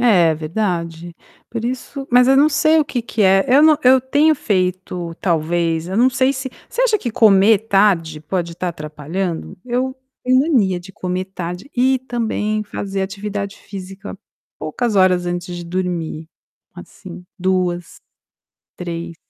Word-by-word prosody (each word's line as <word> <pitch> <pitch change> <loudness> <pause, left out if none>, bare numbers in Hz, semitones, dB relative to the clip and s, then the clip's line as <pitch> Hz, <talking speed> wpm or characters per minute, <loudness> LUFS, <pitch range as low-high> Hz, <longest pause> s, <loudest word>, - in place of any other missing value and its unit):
É 180 -9 +4
verdade, 170 0 -3 0.4
por 230 -1 -4
isso 260 +2 -4
mas 250 +1 +6
eu 270 - +5
não 290 +3 +6
sei 315 +1 +3
o 305 - +3
que 250 -4 -3
que 225 -1 -2
é. 195 0 +5
Eu 270 +4 +6
não 310 -1 +6
eu 260 +1 +6
tenho 290 +5 +3
feito 185 - -2
talvez, 165 -1 0
eu 190 - -3
não 245 +3 +5
sei 260 +2 +2
se 260 0 -5 0.2
você - - -1
acha 440 -4 +3
que 240 -10 -3
comer 210 -1 +5
tarde 180 -7 +2
pode 170 +2 -3
estar 180 +2 -3
atrapalhando? 160 +2 -5
Eu 255 +1 -1 0.3
tenho 255 +1 +4
mania 225 - +2
de 190 +2 -13
comer 185 +1 -3
tarde 180 +3 -6
e 260 +2 +3
também 220 -4 -2
fazer 195 -1 -4
atividade 200 +1 -4
física 195 +1 -9 0.4
poucas 215 +9 -2
horas 185 -2 +3
antes 175 0 -4
de 175 - -7
dormir, 170 -3 -3 0.5
assim, 180 0 -11
2, 180 -2 -1 0.8
3. 170 -1 -6
195 Hz, 150 wpm, -19 LUFS, 175-245 Hz, 0.8 s, mas